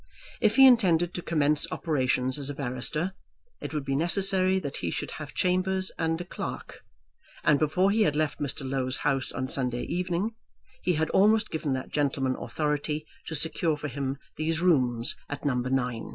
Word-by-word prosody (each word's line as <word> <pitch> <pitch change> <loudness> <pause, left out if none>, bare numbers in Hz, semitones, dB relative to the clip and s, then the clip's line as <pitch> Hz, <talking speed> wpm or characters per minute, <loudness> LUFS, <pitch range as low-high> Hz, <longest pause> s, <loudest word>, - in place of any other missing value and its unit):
If 215 -3 +3
he 270 - +9
intended 180 -9 +4
to 175 - -4
commence 150 -3 +1
operations 130 -3 0
as 140 0 -1
a 145 - -4
barrister, 145 +6 -1 0.5
it - - -5
would 150 -3 -3
be 135 -1 -1
necessary 190 +4 +4
that 145 -7 -4
he 85 - -2
should - - -4
have - - -8
chambers 185 +1 +1
and 165 0 0
a 175 - -5
clerk; - - -6 0.6
and 145 -2 +4
before 180 +6 +2
he 220 +2 +2
had 150 -9 +3
left 155 0 -1
Mr. 140 -1 -3
Low's 130 -1 -2
house 135 -1 +1
on 130 - -3
Sunday 125 -2 -2
evening 180 +4 -2 0.5
he 180 - +1
had 160 0 0
almost 215 +3 +3
given 155 -3 -1
that 130 0 -4
gentleman 135 -3 0
authority 150 0 -2 0.2
to 160 - -3
secure 160 +1 +1
for 150 0 -5
him 135 +1 -3 0.2
these 160 +1 -1
rooms 125 -9 +2
at 145 0 -6
No. 125 -2 -1
150 Hz, 175 wpm, -27 LUFS, 135-180 Hz, 0.6 s, he